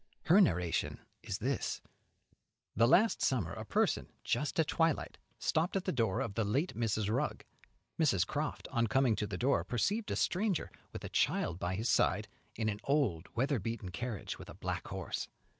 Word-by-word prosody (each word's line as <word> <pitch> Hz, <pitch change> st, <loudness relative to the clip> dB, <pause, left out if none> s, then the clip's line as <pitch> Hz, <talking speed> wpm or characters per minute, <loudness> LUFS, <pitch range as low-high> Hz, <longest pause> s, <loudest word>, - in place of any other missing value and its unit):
Her 185 Hz, +6 st, +6 dB
narration 90 Hz, -, +1 dB, 0.2 s
is 95 Hz, -, -3 dB
this: 130 Hz, +5 st, -1 dB, 1.0 s
The 115 Hz, +3 st, +5 dB
last 210 Hz, -, +4 dB
summer 100 Hz, -11 st, +1 dB
a -, -, -5 dB
person, -, -, +1 dB, 0.2 s
just 140 Hz, +7 st, 0 dB
at 160 Hz, -, +5 dB
twilight, 165 Hz, -1 st, 0 dB, 0.2 s
stopped 165 Hz, +5 st, 0 dB
at 190 Hz, -, 0 dB
the -, -, +1 dB
door 115 Hz, -7 st, +1 dB
of 110 Hz, -, -2 dB
the 115 Hz, -, 0 dB
late 135 Hz, -, 0 dB
Mrs. 110 Hz, -3 st, 0 dB
Rugg. 110 Hz, -, -1 dB, 0.5 s
Mrs. 100 Hz, -, +3 dB
Croft, 150 Hz, +5 st, -3 dB
on 115 Hz, -2 st, +2 dB
coming 130 Hz, -1 st, +3 dB
to 105 Hz, -, -1 dB
the 100 Hz, -, -4 dB
door, 135 Hz, +3 st, +2 dB
perceived 205 Hz, -, 0 dB
a -, -, 0 dB
stranger, 190 Hz, -1 st, 0 dB, 0.2 s
with -, -, -7 dB
a -, -, -5 dB
child 85 Hz, +2 st, +1 dB
by 90 Hz, +1 st, -1 dB
his 110 Hz, +5 st, -1 dB
side, -, -, +2 dB, 0.3 s
in 110 Hz, -1 st, -1 dB
an 105 Hz, -1 st, -1 dB
old, 130 Hz, -, +1 dB
weather 135 Hz, +2 st, +1 dB
beaten 105 Hz, -2 st, -4 dB
carriage, 105 Hz, +5 st, -4 dB
with -, -, -10 dB
a -, -, -9 dB
black -, -, -3 dB
horse. -, -, -4 dB
120 Hz, 180 wpm, -33 LUFS, 100-150 Hz, 1.0 s, Her